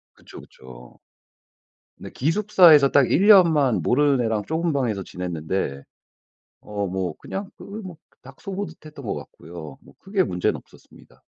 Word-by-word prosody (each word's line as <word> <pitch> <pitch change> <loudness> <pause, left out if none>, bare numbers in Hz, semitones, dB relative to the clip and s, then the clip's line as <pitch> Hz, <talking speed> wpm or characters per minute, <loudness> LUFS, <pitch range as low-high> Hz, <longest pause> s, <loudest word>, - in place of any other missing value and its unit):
그쵸, - - -14
그쵸. 60 -1 -15 1.0
네. - - -9
기숙사에서 165 -2 +4
딱 140 -2 +3
1 195 +6 +2
년만 160 - +5
모르는 140 -1 +2
애랑 110 -2 -1
좁은 160 0 -1
방에서 115 -8 -1
지냈는데 85 -5 -4 0.8
어 100 -1 -4
뭐 95 -1 -3
그냥 195 0 -6
그 - - -12
뭐 200 -4 -9 0.3
닭 135 +1 -15
소 195 - -7
보듯 200 -5 -7
했던 150 -4 -11
것 105 - -3
같고요. 80 -4 -10
뭐 - - -19
크게 195 -1 -1
문제는 90 0 -1
없었습니다. - - -19
135 Hz, 285 characters per minute, -23 LUFS, -, 1.0 s, 년만